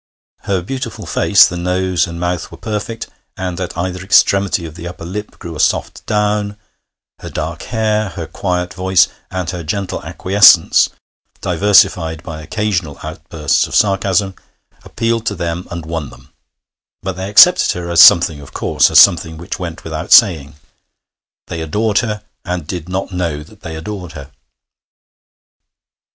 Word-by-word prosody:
Her 95 -3 -1
beautiful 130 +7 -6
face - - +4
(the 90 - -6
nose 90 +1 0
and 85 0 -7
mouth 90 -1 -3
were - - -11
perfect, 110 +1 -5 0.3
and 95 -1 -4
at 90 - -5
either 90 +1 -3
extremity 100 -1 +2
of 80 - -8
the 85 +1 -8
upper 85 -1 -9
lip 105 +4 -7
grew 85 -2 -8
a - - -8
soft - - 0
down), 105 -1 -1 0.6
her - - -8
dark - - -5
hair, 110 -2 -1
her 85 -2 -6
quiet 90 0 -3
voice 95 -1 +2 0.2
and 90 -2 -4
her 90 -2 -6
gentle 95 +4 -4
acquiescence 100 +1 +4 0.5
(diversified 90 -3 +2
by 80 -2 -7
occasional 90 -3 -2
outbursts 80 -2 -1
of - - -6
sarcasm), 95 -1 +1 0.5
appealed 115 0 -2
to 100 - -1
them 85 0 -4
and 85 -2 -6
won 80 -3 -4
them; - - -18 0.7
but 95 -1 -3
they 95 +1 -5
accepted 180 - +6
her 85 -1 -5
as 85 -1 +6
something 85 -4 +6
of 70 - -14
course, - - +2
as - - +6
something 85 -4 +4
which 85 +5 -6
went 85 -2 -6
without 80 0 -6
saying. 80 - +5 0.9
They 85 - -6
adored 105 +6 0
her, 105 -4 -3 0.2
and 90 -4 -4
did 85 +1 -6
not 95 +1 -3
know 85 -5 -3
that 105 +6 -19
they 80 -4 -7
adored 90 +1 -7
her. 70 -2 -10
90 Hz, 155 wpm, -16 LUFS, 85-100 Hz, 0.9 s, accepted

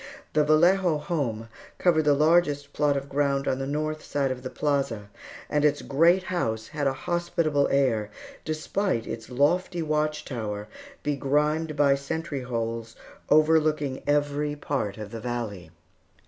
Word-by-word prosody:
The 150 - +4
Vallejo 170 +3 +4
home 140 -8 -2 0.3
covered 160 -4 +3
the 145 -1 +5
largest 150 -2 +2
plot 145 -1 +2
of 140 0 -4
ground 140 0 0
on 130 - 0
the 135 - -3
north 155 +2 -2
side 140 -2 -1
of 130 -1 -5
the 130 - -5
plaza, 130 -9 -1 0.4
and 150 0 0
its 150 -1 +2
great 170 +6 +4
house 115 - -2
had 145 -2 -1
a 135 - +1
hospitable 170 -4 +1
air, 120 -7 +1 0.3
despite 155 - -1
its 115 -1 -6
lofty 165 +7 +1
watchtower, 140 -9 -2 0.4
begrimed 150 +2 0
by 145 -1 +4
sentry 140 +1 -3
holes, 115 -2 -4 0.3
overlooking 155 -3 +3
every 145 0 +1
part 135 -9 -3
of 105 -1 -7
the 115 - -6
valley. 115 -8 -4
145 Hz, 140 wpm, -26 LUFS, 125-155 Hz, 0.4 s, the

